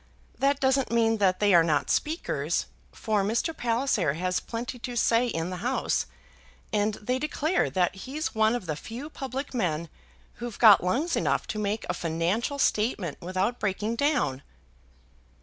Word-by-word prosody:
That 280 Hz, +1 st, +2 dB
doesn't 265 Hz, 0 st, +2 dB
mean 225 Hz, -1 st, +3 dB
that 185 Hz, -3 st, +2 dB
they 205 Hz, -2 st, +4 dB
are 170 Hz, -1 st, +7 dB
not 150 Hz, -4 st, +1 dB
speakers, 315 Hz, +3 st, -1 dB, 0.3 s
for 215 Hz, -3 st, 0 dB
Mr. 230 Hz, -, 0 dB
Palliser 230 Hz, -, 0 dB
has 180 Hz, +2 st, 0 dB
plenty 245 Hz, +2 st, -6 dB
to 245 Hz, +1 st, -5 dB
say 235 Hz, +1 st, +3 dB
in 165 Hz, -5 st, -3 dB
the 180 Hz, -, -4 dB
House, 245 Hz, +8 st, 0 dB, 0.7 s
and 210 Hz, 0 st, +1 dB
they 250 Hz, +4 st, -2 dB
declare 305 Hz, +4 st, 0 dB
that 180 Hz, -2 st, +1 dB
he's 270 Hz, -, -4 dB
one 220 Hz, +1 st, +3 dB
of 240 Hz, -, -4 dB
the 155 Hz, -3 st, -2 dB
few 245 Hz, -, -8 dB
public 270 Hz, 0 st, -5 dB
men 170 Hz, -8 st, -1 dB, 0.5 s
who've 240 Hz, -3 st, -6 dB
got 215 Hz, -6 st, +7 dB
lungs 275 Hz, -, 0 dB
enough -, -, 0 dB
to 215 Hz, -, -3 dB
make 210 Hz, +1 st, -2 dB
a -, -, 0 dB
financial 175 Hz, -, -1 dB
statement 210 Hz, -, 0 dB
without 185 Hz, +7 st, -1 dB
breaking 210 Hz, +3 st, -1 dB
down." 265 Hz, -, +1 dB
225 Hz, 160 wpm, -27 LUFS, 185-255 Hz, 0.7 s, are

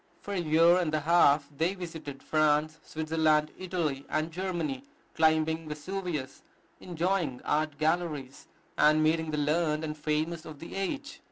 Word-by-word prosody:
For 205 Hz, -, -6 dB
a 195 Hz, -, 0 dB
year 165 Hz, +2 st, +5 dB
and 170 Hz, -4 st, 0 dB
a 155 Hz, -, 0 dB
half 150 Hz, -3 st, +4 dB
they 165 Hz, +6 st, 0 dB
visited 160 Hz, -6 st, -7 dB
France, 155 Hz, 0 st, +2 dB
Switzerland, 155 Hz, -1 st, +1 dB
Italy, 170 Hz, -7 st, -2 dB
and 155 Hz, +2 st, -1 dB
Germany, 165 Hz, -7 st, -3 dB, 0.3 s
climbing 160 Hz, 0 st, +2 dB
Vesuvius, 150 Hz, -3 st, -4 dB, 0.4 s
enjoying 175 Hz, -6 st, -1 dB
art 155 Hz, -1 st, 0 dB
galleries, 155 Hz, -4 st, -2 dB, 0.3 s
and 155 Hz, +1 st, +5 dB
meeting 160 Hz, +1 st, +1 dB
the 150 Hz, -, -2 dB
learned 155 Hz, +1 st, +1 dB
and 150 Hz, -1 st, -3 dB
famous 155 Hz, +2 st, -2 dB
of 155 Hz, -3 st, -9 dB
the 165 Hz, -, -9 dB
age. 275 Hz, +9 st, -4 dB
155 Hz, 145 wpm, -29 LUFS, 150-170 Hz, 0.4 s, year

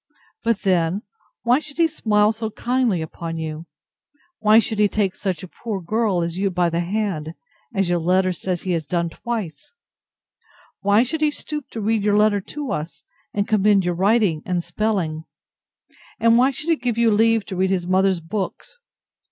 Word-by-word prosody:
But, 230 Hz, -3 st, +1 dB
then, 185 Hz, +1 st, +1 dB, 0.4 s
why 245 Hz, +3 st, +4 dB
should 305 Hz, -1 st, -9 dB
he 335 Hz, -1 st, +4 dB
smile 210 Hz, -8 st, +2 dB
so 220 Hz, 0 st, -4 dB
kindly 235 Hz, -6 st, 0 dB
upon 165 Hz, +1 st, -6 dB
you? 160 Hz, +1 st, -5 dB, 0.7 s
Why 215 Hz, 0 st, +5 dB
should 220 Hz, -1 st, +2 dB
he 210 Hz, -, +5 dB
take 200 Hz, -2 st, 0 dB
such 185 Hz, -5 st, -3 dB
a -, -, -7 dB
poor 210 Hz, +2 st, -5 dB
girl 200 Hz, -1 st, 0 dB
as 170 Hz, +2 st, -3 dB
you 200 Hz, 0 st, +1 dB
by 175 Hz, -2 st, +1 dB
the 170 Hz, -, 0 dB
hand, 175 Hz, -4 st, -2 dB, 0.4 s
as 195 Hz, -2 st, +1 dB
your 175 Hz, 0 st, +1 dB
letter 185 Hz, +2 st, +2 dB
says 180 Hz, 0 st, -3 dB
he 185 Hz, -, -2 dB
has 165 Hz, -4 st, -1 dB
done 170 Hz, 0 st, -1 dB
twice? 200 Hz, -12 st, -5 dB, 1.1 s
Why 205 Hz, +3 st, +4 dB
should 300 Hz, +5 st, -3 dB
he 305 Hz, -, +4 dB
stoop 300 Hz, -1 st, -6 dB
to 225 Hz, -, -6 dB
read 215 Hz, 0 st, +1 dB
your 205 Hz, 0 st, +3 dB
letter 210 Hz, -1 st, +3 dB
to 290 Hz, +7 st, -6 dB
us; 155 Hz, +3 st, -5 dB, 0.3 s
and 205 Hz, 0 st, -1 dB
commend 205 Hz, -3 st, +3 dB
your 175 Hz, -, +1 dB
writing 190 Hz, -3 st, +2 dB
and 180 Hz, -2 st, -1 dB
spelling? 175 Hz, -4 st, -2 dB, 0.9 s
And 230 Hz, 0 st, +5 dB
why 250 Hz, +3 st, +5 dB
should 305 Hz, +5 st, -2 dB
he 325 Hz, -, +3 dB
give 245 Hz, -3 st, -2 dB
you 235 Hz, -1 st, +4 dB
leave 225 Hz, 0 st, +3 dB
to 190 Hz, -, -6 dB
read 190 Hz, +1 st, +1 dB
his 185 Hz, -2 st, 0 dB
mother's 185 Hz, -1 st, +2 dB
books? 210 Hz, -, -5 dB
200 Hz, 185 wpm, -22 LUFS, 175-225 Hz, 1.1 s, Why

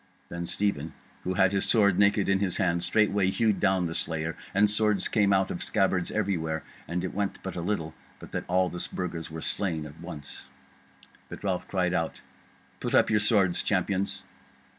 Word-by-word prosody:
Then 85 Hz, 0 st, -5 dB
Stephen, 80 Hz, -7 st, -1 dB, 0.3 s
who 95 Hz, -, -2 dB
had 95 Hz, +1 st, +4 dB
his 100 Hz, -1 st, +1 dB
sword 100 Hz, -4 st, +3 dB
naked 100 Hz, 0 st, +3 dB
in 95 Hz, 0 st, +3 dB
his 95 Hz, -3 st, -1 dB
hand, 85 Hz, -4 st, +1 dB
straightway 100 Hz, -2 st, +3 dB
hewed 110 Hz, 0 st, +1 dB
down 95 Hz, -2 st, +2 dB
the 80 Hz, -, -3 dB
slayer, 80 Hz, 0 st, -2 dB, 0.2 s
and 100 Hz, +2 st, +4 dB
swords 105 Hz, -2 st, +3 dB
came 105 Hz, -3 st, +2 dB
out 95 Hz, -1 st, +2 dB
of 85 Hz, -, -4 dB
the -, -, -1 dB
scabbards 95 Hz, -4 st, +1 dB
everywhere; 85 Hz, -7 st, -1 dB, 0.2 s
and 85 Hz, +1 st, -2 dB
it 95 Hz, -, -3 dB
went 100 Hz, 0 st, -2 dB
but 95 Hz, -, -5 dB
a 85 Hz, -, -3 dB
little 85 Hz, -4 st, -2 dB, 0.2 s
but -, -, -12 dB
that -, -, -3 dB
all 90 Hz, +1 st, +2 dB
the 90 Hz, -, -3 dB
Burgers 85 Hz, -3 st, -4 dB
were 80 Hz, 0 st, -7 dB
slain 85 Hz, -6 st, -2 dB
at 75 Hz, +1 st, -11 dB
once. 75 Hz, -7 st, -9 dB, 0.8 s
But -, -, -9 dB
Ralph 95 Hz, -3 st, -1 dB
cried 90 Hz, -2 st, 0 dB
out: 80 Hz, -3 st, -2 dB, 0.6 s
"Put -, -, -1 dB
up -, -, +4 dB
your 105 Hz, -, +4 dB
swords, 100 Hz, -4 st, +3 dB
Champions! 100 Hz, 0 st, -1 dB
95 Hz, 190 wpm, -28 LUFS, 85-100 Hz, 0.8 s, had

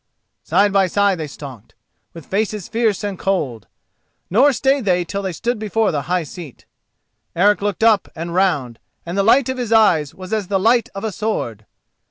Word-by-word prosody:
Side 200 Hz, +4 st, +2 dB
by 195 Hz, -1 st, +4 dB
side 200 Hz, -1 st, +1 dB
they 155 Hz, -, -4 dB
stalked, 135 Hz, -6 st, -11 dB, 0.4 s
with 165 Hz, -, -10 dB
faces 210 Hz, -1 st, -2 dB
fierce 225 Hz, -3 st, 0 dB
and 200 Hz, -3 st, -4 dB
cold; 135 Hz, -, -2 dB, 0.6 s
nor 260 Hz, +9 st, +5 dB
stayed 270 Hz, +1 st, +1 dB
they 180 Hz, -2 st, +1 dB
till 200 Hz, +4 st, -4 dB
they 190 Hz, -1 st, -3 dB
stood 235 Hz, +7 st, -2 dB
before 220 Hz, 0 st, 0 dB
the 145 Hz, -, -1 dB
high 180 Hz, -1 st, +1 dB
seat. 155 Hz, -3 st, -11 dB, 0.7 s
Eric 205 Hz, +4 st, +3 dB
looked 205 Hz, +1 st, -2 dB
up 220 Hz, -4 st, +4 dB
and 170 Hz, +1 st, -5 dB
round, 145 Hz, -11 st, 0 dB, 0.3 s
and 170 Hz, +1 st, -5 dB
the 200 Hz, -, +2 dB
light 235 Hz, +6 st, +4 dB
of 260 Hz, 0 st, -3 dB
his 240 Hz, -3 st, -3 dB
eyes 175 Hz, -10 st, +3 dB
was 185 Hz, +2 st, -8 dB
as 210 Hz, -4 st, -1 dB
the 195 Hz, 0 st, 0 dB
light 230 Hz, +4 st, +2 dB
of 195 Hz, -, -6 dB
a 220 Hz, -, -2 dB
sword. 120 Hz, -, -4 dB
195 Hz, 190 wpm, -19 LUFS, 170-220 Hz, 0.7 s, nor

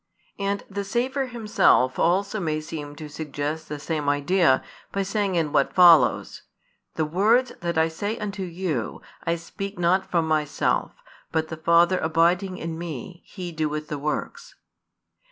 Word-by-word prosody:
And 200 Hz, 0 st, -1 dB
the 200 Hz, 0 st, -4 dB
Saviour 255 Hz, +6 st, -1 dB
Himself 210 Hz, -, +2 dB
also 195 Hz, +5 st, +1 dB
may 155 Hz, -4 st, -1 dB
seem 150 Hz, -2 st, -7 dB
to 155 Hz, +1 st, -8 dB
suggest 150 Hz, +1 st, -4 dB
the 150 Hz, -, -4 dB
same 150 Hz, -1 st, -2 dB
idea, 145 Hz, 0 st, +3 dB, 0.3 s
by 195 Hz, -, -1 dB
saying 200 Hz, -1 st, -1 dB
in 160 Hz, -3 st, 0 dB
what 140 Hz, -, +1 dB
follows: 175 Hz, -3 st, +5 dB, 0.5 s
The 160 Hz, -, 0 dB
words 215 Hz, +10 st, +3 dB
that 170 Hz, -1 st, -2 dB
I 160 Hz, 0 st, +4 dB
say 205 Hz, +7 st, -3 dB
unto 200 Hz, -2 st, -5 dB
you, 170 Hz, -9 st, -3 dB, 0.2 s
I 165 Hz, -, +1 dB
speak 195 Hz, +4 st, -7 dB
not 180 Hz, +2 st, +2 dB
from 165 Hz, -2 st, +1 dB
Myself: 155 Hz, -2 st, 0 dB, 0.4 s
but 160 Hz, -1 st, -1 dB
the 160 Hz, -, -5 dB
Father 170 Hz, +3 st, +4 dB
abiding 175 Hz, +4 st, +1 dB
in 165 Hz, 0 st, -5 dB
Me, 170 Hz, +1 st, -7 dB
He 180 Hz, -3 st, -7 dB
doeth 155 Hz, -1 st, -3 dB
the 150 Hz, -, -3 dB
works. 150 Hz, +2 st, -4 dB
170 Hz, 155 wpm, -24 LUFS, 155-195 Hz, 0.5 s, follows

